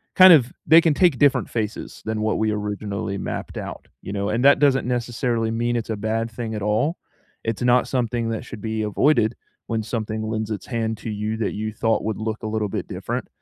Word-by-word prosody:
kind 185 -1 +10
of 130 -6 +5
they 160 +2 +8
can 165 -2 +3
take 170 -4 +3
different 145 +1 +3
faces 110 -2 -4
than 110 -1 -2
what 110 - +1
we 110 0 +1
originally 105 -1 -3
mapped - - -5
out, - - -6 0.2
you 100 - -6
know? 100 0 -1
And 115 +5 0
that 140 - +7
doesn't 135 -3 +3
necessarily 120 -2 -1
mean 120 +1 0
it's 115 -1 -3
a 110 - -2
bad 115 +2 -2
thing 115 -1 -5
at 105 - -4
all. 110 - +1 0.5
It's 115 -1 -3
not 125 0 +3
something 120 -2 -1
that 110 -1 -3
should 110 -4 -9
be 110 -1 -2
avoided 110 +1 +2 0.3
when 115 -2 -1
something 110 -1 -3
lends 110 0 -3
its 105 - -4
hand 110 -2 -2
to - - -6
you 105 +1 -2
that 110 - -1
you 110 +1 -3
thought 110 0 0
would 110 -2 -2
look 110 +1 -4
a 110 - -2
little 110 -2 -1
bit - - -4
different. - - -4
110 Hz, 220 wpm, -23 LUFS, 110-120 Hz, 0.5 s, kind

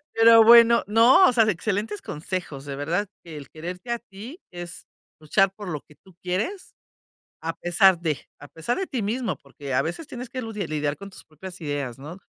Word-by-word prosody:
pero 225 0 +7
bueno 235 0 +7
no, 230 - +6
o - - +2
sea, 225 -2 +4
excelentes 210 +2 -2
consejos, 150 -3 -5
de 140 - -5
verdad 170 +8 -1 0.2
que 165 -2 -10
el 140 -2 -10
quererte 180 +6 -8
a 235 - 0
ti, 235 - -11
es 175 -1 -8 0.3
luchar 185 +5 +2
por 205 -3 -8
lo 150 -4 -4
que 150 - -21
tú 185 -3 -19
quieres 205 - -3 0.7
a 165 0 -2
pesar 175 +1 +4
de, 155 -5 -1 0.2
a 145 - -12
pesar 165 - -3
de 385 - -2
ti 250 - -3
mismo, 230 +4 -2
porque 140 -1 -8
a - - +3
veces 175 - -5
tienes 250 0 -8
que 260 -1 -4
ludiar 210 -6 -5
lidiar 150 -1 -1
con 200 0 -10
tus - - -14
propias 175 +4 -11
ideas, 140 -5 -4
¿no? 155 +7 -9
185 Hz, 200 wpm, -24 LUFS, 155-225 Hz, 0.7 s, pero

